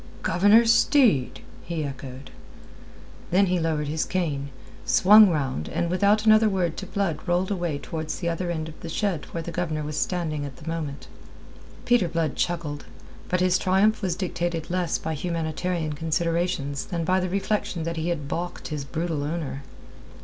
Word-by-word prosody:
"Governor 205 Hz, +7 st, +5 dB
Steed!" 230 Hz, -, +3 dB, 0.2 s
he 170 Hz, -2 st, -3 dB
echoed. 135 Hz, -1 st, -7 dB, 1.0 s
Then 190 Hz, +3 st, +4 dB
he 180 Hz, -1 st, +1 dB
lowered 155 Hz, -2 st, -1 dB
his 155 Hz, +2 st, -1 dB
cane, 150 Hz, -7 st, -2 dB, 0.3 s
swung 210 Hz, +2 st, +7 dB
round, 135 Hz, -, -2 dB
and 170 Hz, -, -1 dB
without 205 Hz, +3 st, +3 dB
another 215 Hz, 0 st, +6 dB
word 180 Hz, -4 st, 0 dB
to -, -, -5 dB
Blood 185 Hz, -7 st, -1 dB
rolled 180 Hz, +3 st, +1 dB
away 175 Hz, -6 st, -1 dB
towards 155 Hz, +1 st, -5 dB
the 170 Hz, -, -3 dB
other 170 Hz, +1 st, -2 dB
end 160 Hz, -2 st, -2 dB
of 155 Hz, -, -11 dB
the 165 Hz, -, -7 dB
shed 180 Hz, -2 st, -1 dB
where 165 Hz, -, -5 dB
the 170 Hz, -, -5 dB
Governor 160 Hz, -3 st, -2 dB
was 150 Hz, 0 st, -4 dB
standing 160 Hz, -5 st, -1 dB
at 140 Hz, -2 st, -6 dB
the 155 Hz, -, -13 dB
moment. 155 Hz, -4 st, -4 dB, 0.8 s
Peter 240 Hz, -7 st, +3 dB
Blood 165 Hz, -3 st, -1 dB
chuckled. 165 Hz, -4 st, -2 dB, 0.4 s
But 180 Hz, 0 st, +1 dB
his 185 Hz, 0 st, +3 dB
triumph 200 Hz, +4 st, +3 dB
was 185 Hz, -4 st, -1 dB
dictated 175 Hz, -3 st, -3 dB
less 180 Hz, -2 st, 0 dB
by 160 Hz, -, -4 dB
humanitarian 165 Hz, 0 st, -2 dB
considerations 160 Hz, -2 st, -1 dB
than 170 Hz, -2 st, -2 dB
by 185 Hz, +2 st, +3 dB
the 185 Hz, 0 st, -2 dB
reflection 195 Hz, -2 st, -1 dB
that 165 Hz, 0 st, -3 dB
he 160 Hz, +2 st, -1 dB
had 150 Hz, -5 st, -2 dB
baulked 175 Hz, +4 st, -4 dB
his 150 Hz, -2 st, -3 dB
brutal 155 Hz, +2 st, -3 dB
owner. 150 Hz, -3 st, -4 dB
170 Hz, 170 wpm, -25 LUFS, 155-185 Hz, 1.0 s, swung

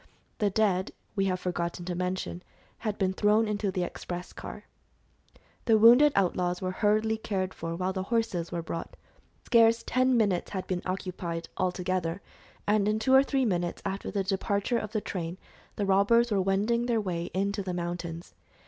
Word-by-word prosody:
The 210 Hz, -3 st, +2 dB
dead, 195 Hz, -2 st, +1 dB, 0.2 s
we 195 Hz, -2 st, +1 dB
have 185 Hz, -1 st, 0 dB
forgotten 175 Hz, -1 st, -3 dB
to 180 Hz, -, -2 dB
mention, 180 Hz, 0 st, -3 dB, 0.4 s
had 215 Hz, -2 st, -3 dB
been 190 Hz, -1 st, +1 dB
thrown 210 Hz, +3 st, +3 dB
into 205 Hz, -1 st, -1 dB
the 185 Hz, -1 st, -1 dB
express 175 Hz, 0 st, -6 dB
car. -, -, -8 dB, 1.0 s
The 225 Hz, -2 st, +5 dB
wounded 245 Hz, +7 st, +8 dB
outlaws 180 Hz, -2 st, +1 dB
were 185 Hz, -1 st, -2 dB
hurriedly 215 Hz, +3 st, +1 dB
cared 190 Hz, -4 st, -2 dB
for 165 Hz, 0 st, -4 dB
while 185 Hz, +2 st, -1 dB
the 190 Hz, -, -2 dB
horses 225 Hz, -8 st, 0 dB
were 170 Hz, -1 st, -3 dB
brought. 165 Hz, 0 st, -5 dB, 0.5 s
Scarce 230 Hz, -1 st, +5 dB
ten 255 Hz, 0 st, +2 dB
minutes 200 Hz, -6 st, +1 dB
had 190 Hz, -2 st, -4 dB
been 180 Hz, -1 st, -2 dB
occupied, 180 Hz, -3 st, -4 dB
all 185 Hz, -1 st, +1 dB
together, 180 Hz, -1 st, -2 dB, 0.5 s
and 205 Hz, -1 st, +2 dB
in 215 Hz, 0 st, +2 dB
two 240 Hz, +4 st, +1 dB
or 265 Hz, -, +9 dB
three 275 Hz, -1 st, +1 dB
minutes 175 Hz, -5 st, -1 dB
after 195 Hz, +1 st, -3 dB
the 200 Hz, -2 st, -1 dB
departure 200 Hz, +4 st, 0 dB
of 210 Hz, -, -6 dB
the 215 Hz, -2 st, -1 dB
train 175 Hz, -3 st, -4 dB, 0.4 s
the 205 Hz, -, -1 dB
robbers 205 Hz, +5 st, +4 dB
were 200 Hz, -2 st, +2 dB
wending 210 Hz, +6 st, +1 dB
their 235 Hz, -2 st, +2 dB
way 175 Hz, -5 st, -2 dB
into 200 Hz, +2 st, 0 dB
the 190 Hz, -1 st, -4 dB
mountains. 175 Hz, -1 st, -5 dB
195 Hz, 175 wpm, -28 LUFS, 180-215 Hz, 1.0 s, or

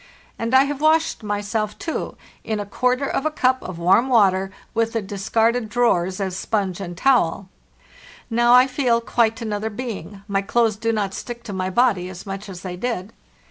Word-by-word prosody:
And 230 Hz, +3 st, 0 dB
I 265 Hz, -, +7 dB
have 285 Hz, 0 st, -4 dB
washed 315 Hz, -1 st, +2 dB
myself, 210 Hz, +1 st, -2 dB
too, 325 Hz, -, -4 dB, 0.3 s
in 220 Hz, -1 st, -2 dB
a 205 Hz, -, -3 dB
quarter 250 Hz, +6 st, 0 dB
of 270 Hz, -, -1 dB
a 310 Hz, -, +1 dB
cup 260 Hz, -4 st, +1 dB
of 185 Hz, -2 st, -7 dB
warm 190 Hz, +9 st, +3 dB
water, 195 Hz, -5 st, +3 dB, 0.2 s
with 230 Hz, +1 st, 0 dB
the 225 Hz, -, 0 dB
discarded 220 Hz, +4 st, 0 dB
drawers 190 Hz, -6 st, +1 dB
as 190 Hz, -2 st, -2 dB
sponge 195 Hz, -2 st, -2 dB
and 175 Hz, -2 st, -6 dB
towel. 195 Hz, -7 st, +2 dB, 0.8 s
Now 240 Hz, +1 st, +4 dB
I 250 Hz, +1 st, +7 dB
feel 255 Hz, -3 st, +1 dB
quite 230 Hz, -1 st, +1 dB
another 215 Hz, 0 st, -2 dB
being; 205 Hz, -4 st, -7 dB
my 195 Hz, -1 st, 0 dB
clothes 225 Hz, +1 st, +1 dB
do 230 Hz, +2 st, -1 dB
not 205 Hz, -3 st, -1 dB
stick 235 Hz, +2 st, -7 dB
to 205 Hz, -, -7 dB
my 185 Hz, 0 st, -2 dB
body 195 Hz, -4 st, +2 dB
as 185 Hz, 0 st, -9 dB
much 195 Hz, +1 st, -6 dB
as 180 Hz, -2 st, -8 dB
they 185 Hz, -2 st, -5 dB
did. 225 Hz, -2 st, -3 dB
220 Hz, 185 wpm, -22 LUFS, 195-245 Hz, 0.8 s, I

